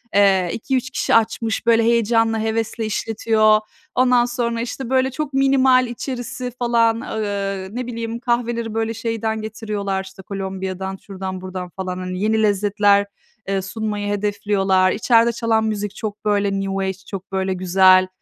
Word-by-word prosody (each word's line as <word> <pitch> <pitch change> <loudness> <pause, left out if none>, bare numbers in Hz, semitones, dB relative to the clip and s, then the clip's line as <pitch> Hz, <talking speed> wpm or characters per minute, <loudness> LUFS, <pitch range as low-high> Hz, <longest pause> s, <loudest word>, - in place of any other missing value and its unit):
eee 195 -3 +4
2-3 260 +2 -1
kişi - - +1
açmış, 225 0 +1
böyle, 230 -1 +4
heyecanla, 225 -1 +2
hevesle 225 0 -2
işletiyor. 215 0 +2 0.4
Ondan 250 -1 +4
sonra 235 -1 -2
işte 245 +1 -5
böyle 260 0 +2
çok 295 0 -4
minimal 265 -2 +4
içerisi 250 0 -5
falan, 230 -1 +2
ııı, 200 -3 -3
ne 250 0 -3
bileyim, 230 -1 -4
kahveleri 235 -2 -1
böyle, 225 0 -1
şeyden 225 -1 -2
getiriyorlar, 210 -3 -3
işte, 190 0 -12
Kolombiya'dan, 190 -1 -4
şuradan 190 -1 -6
buradan 185 -1 -6
falan. 185 0 -5
Hani, 185 0 -4
yeni 220 0 +2
lezzetler, 205 0 +3 0.4
eee, 195 -1 0
sunmayı 210 0 -3
hedefliyorlar. 195 -2 +1
İçeride 230 +2 +3
çalan 230 -1 +1
müzik 210 -2 -3
çok 210 -1 -6
böyle 205 -1 +2
New 195 0 -2
Age 190 - -1
çok 195 -1 -7
böyle 190 0 0
güzel. 185 0 +5
215 Hz, 145 wpm, -21 LUFS, 195-230 Hz, 0.4 s, güzel